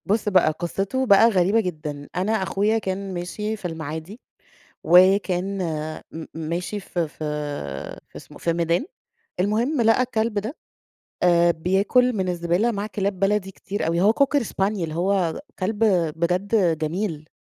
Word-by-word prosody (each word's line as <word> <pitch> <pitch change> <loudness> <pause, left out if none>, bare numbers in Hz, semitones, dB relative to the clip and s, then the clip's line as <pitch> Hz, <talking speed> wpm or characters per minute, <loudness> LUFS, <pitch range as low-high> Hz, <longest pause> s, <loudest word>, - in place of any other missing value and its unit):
بُص 210 +1 +1
بقى 185 -5 +4
قصته 195 +10 -2
بقى 225 0 +6
غريبة 195 +1 +3
جدًا. 150 -7 -4
أنا 185 +4 0
أخويا 210 +1 +1
كان 195 -2 -3
ماشي 210 +5 -3
في 210 - -12
المعادي 160 - -6 0.6
وكان 185 +2 +4 0.5
م 160 0 -7
ماشي 170 +5 -3
في 175 -4 -3
في - - -22 0.9
في - - -30
اسم - - -13
في 170 - 0
ميدان. 170 - 0 0.5
المهم 230 +9 +1
لقى 225 +2 +4
الكلب 225 -3 -1
ده، 225 - -6 0.7
آآ، 175 -1 +5
بياكل 195 +9 +2
من 190 -2 -1
الزبالة 175 +5 +1
مع 200 -1 -3
كلاب 200 -2 -3
بلدي 195 -1 +1
كتير 195 0 -4
أوي 170 +1 +1
هو 205 +4 +5
Cocker 280 +3 +2
Spaniel 195 -5 -1
هو 180 0 0 0.2
كلب 210 +3 0 0.3
بجد 180 0 +1
جميل. 160 -1 -3
190 Hz, 140 wpm, -23 LUFS, 170-210 Hz, 0.9 s, بقى